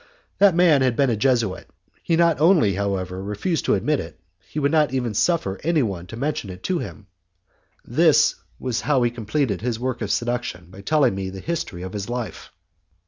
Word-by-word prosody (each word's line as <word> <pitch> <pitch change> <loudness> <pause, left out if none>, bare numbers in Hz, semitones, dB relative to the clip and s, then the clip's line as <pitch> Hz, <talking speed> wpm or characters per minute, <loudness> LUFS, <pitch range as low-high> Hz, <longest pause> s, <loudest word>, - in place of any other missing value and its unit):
That 200 -3 +6
man 170 -6 +5
had 130 -2 +2
been 135 -1 +2
a - - +1
Jesuit. 115 -4 0 0.3
He 165 - +1
not 165 -3 +3
only, 160 - +5
however, 95 -2 -2
refused 105 - -2
to - - +3
admit 150 -1 0
it, 80 - -8 0.2
but 95 - -34
he - - -9
would 145 -1 +1
not 155 -3 +3
even 125 -4 -1
suffer 115 - 0
anyone 115 - 0
to 115 - -8
mention 140 -6 -2
it 90 0 -9
to 180 -2 0
him. 105 - -8 0.8
This - - +4 0.3
is 125 -2 -2
how 135 -3 +2
he 120 - +1
completed 115 -2 -1
his 115 -1 -2
work 125 -1 -3
of 105 - -2
seduction 120 -8 -2
by 95 +1 -11
telling 145 -1 +2
me 95 0 -4
the 95 0 -8
history 105 - -4
of 95 - -7
his 100 +1 -5
life. 120 -2 -5
120 Hz, 195 wpm, -23 LUFS, 100-150 Hz, 0.8 s, That